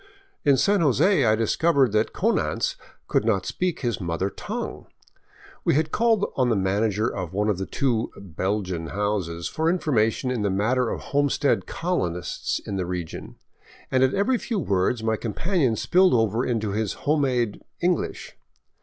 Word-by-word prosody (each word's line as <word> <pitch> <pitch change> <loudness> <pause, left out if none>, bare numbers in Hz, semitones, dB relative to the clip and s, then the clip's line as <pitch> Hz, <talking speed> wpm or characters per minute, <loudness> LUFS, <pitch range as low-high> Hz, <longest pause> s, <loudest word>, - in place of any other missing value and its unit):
In 140 -3 +4
San 200 +8 +3
Jose 150 - +3
I 110 -1 +4
discovered 135 +4 +2
that 105 +1 +1
Konanz - - 0 0.3
could - - +1
not 105 -4 +1
speak 180 -2 -2
his 120 -6 -1
mother 90 +3 -2
tongue. - - -6 0.8
We - - +2
had 155 +1 +1
called 225 -3 +2
on 130 -2 +2
the 115 - +2
manager 105 +3 +1
of 90 -2 -4
one 105 +2 +1
of 100 -3 0
the 95 - -3
two 120 -5 0
" - - -19
Belgian 95 -1 -3
" - - -6
houses 95 -5 -1
for 160 +1 0
information 130 -8 +1
in 125 -4 -1
the 100 - +1
matter 115 +6 +1
of - - -4
homestead 145 0 +1
colonists 90 - -2
in 100 - -5
the 90 -2 -2
region, 90 -3 -5 0.6
and 130 - +3
at 130 - +2
every 240 +5 +2
few 230 - -3
words 105 - 0
my 110 -1 +1
companion 130 - 0
spilled 185 - +3
over 110 +1 +1
into 110 -5 -1
his 105 0 -1
home 150 +1 +3
made 125 -6 0
" - - -51
English." 175 -1 -1
115 Hz, 170 wpm, -24 LUFS, 100-145 Hz, 0.8 s, In